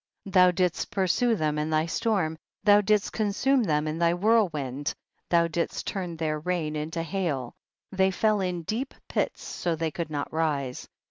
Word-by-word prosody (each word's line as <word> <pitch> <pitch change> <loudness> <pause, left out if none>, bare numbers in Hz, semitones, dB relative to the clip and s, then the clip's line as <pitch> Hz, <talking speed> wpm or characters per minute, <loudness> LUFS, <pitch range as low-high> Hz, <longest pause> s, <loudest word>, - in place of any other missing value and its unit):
16. 195 - -8
Thou 180 -2 +7
didst 180 -1 0
pursue 205 +5 +2
them 150 -4 0
in 150 +1 -1
thy 155 0 +2
storm, 170 -2 0 0.3
thou 205 -1 +6
didst 210 0 +1
consume 240 +6 +2
them 155 -7 +1
in 155 +2 -3
thy 170 0 +3
whirlwind, 165 - +1 0.3
thou 170 -1 +4
didst 170 +1 -2
turn 180 -4 -4
their 155 -1 -1
rain 160 -2 -2
into 160 +2 -3
hail, 160 -8 -2 0.4
they 190 -1 +3
fell 210 +2 +1
in 180 -2 -2
deep 240 - -3
pits - - -2
so 175 - -2
that 160 - -5
they 160 -1 0
could 165 0 -4
not 145 -1 -4
rise. 145 -5 -1
170 Hz, 180 wpm, -27 LUFS, 155-195 Hz, 0.4 s, Thou